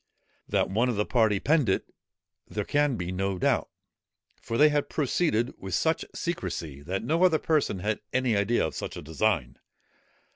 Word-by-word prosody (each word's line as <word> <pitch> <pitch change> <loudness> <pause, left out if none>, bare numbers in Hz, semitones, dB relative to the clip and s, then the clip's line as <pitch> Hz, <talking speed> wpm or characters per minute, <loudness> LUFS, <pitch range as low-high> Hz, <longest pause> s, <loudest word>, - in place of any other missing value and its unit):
That - - +2
one 115 +5 +2
of 120 - 0
the 105 +1 0
party 110 -5 +2
penned 150 -4 +2
it 95 - +1 0.6
there 100 +2 -3
can 145 -2 +2
be 90 -3 -4
no 95 +1 -1
doubt; - - +1 0.7
for 115 - -3
they 150 +1 +7
had 145 -1 0
proceeded 135 -5 0
with 95 -2 -3
so 160 - +3
much - - -5
secresy, 85 - -4
that 95 +7 -3
no 160 +8 +1
other 175 -4 +5
person 150 - 0
had 105 +2 -1
any 130 -3 +1
idea 100 +1 +2
of 80 - -4
such - - -5
a - - -7
design. 80 - -1
110 Hz, 180 wpm, -27 LUFS, 95-145 Hz, 0.7 s, they